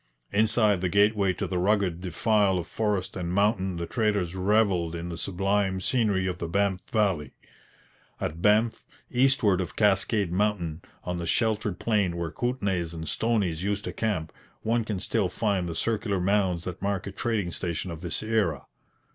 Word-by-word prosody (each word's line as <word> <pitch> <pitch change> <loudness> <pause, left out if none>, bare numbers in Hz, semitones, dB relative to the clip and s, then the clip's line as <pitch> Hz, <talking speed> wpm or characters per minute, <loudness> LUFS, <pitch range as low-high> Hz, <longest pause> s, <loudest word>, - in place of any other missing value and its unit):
Inside 105 -2 +3
the 90 - 0
gateway 100 0 +3
to - - -3
the 90 - -2
rugged 95 -3 +1
defile 95 +2 +2
of 85 - -3
forest 105 -4 -1
and 90 -2 -3
mountain 95 -1 +1
the 85 0 -3
traders 105 -5 0
revelled 95 -3 +2
in 85 +1 -5
the 85 - -4
sublime 95 +1 0
scenery 100 -2 +1
of 90 -1 -2
the 85 - -3
Banff 100 +1 +1
valley. 95 - 0 0.8
At 80 +3 -4
Banff, 110 +3 +3 0.3
eastward 125 -7 +3
of 90 - -5
Cascade 100 -2 +2
mountain, 90 -4 0 0.2
on 90 -1 -3
the 85 - -4
sheltered 110 -2 0
plain 100 -6 +1
where 85 -2 -3
Kootenays 95 - -1
and 80 0 -6
Stonies 100 -8 0
used 100 +1 -1
to - - -5
camp, 95 -8 -2 0.3
one 115 +1 +1
can 105 -3 -3
still - - 0
find 100 -5 0
the 85 - -4
circular 105 -3 -1
mounds 95 -2 +1
that 90 -2 -6
mark 100 -1 -1
a 100 - -5
trading 105 -4 -1
station 85 0 -3
of 80 -1 -7
this 85 +3 -3
era. 105 - 0
95 Hz, 170 wpm, -27 LUFS, 90-105 Hz, 0.8 s, Inside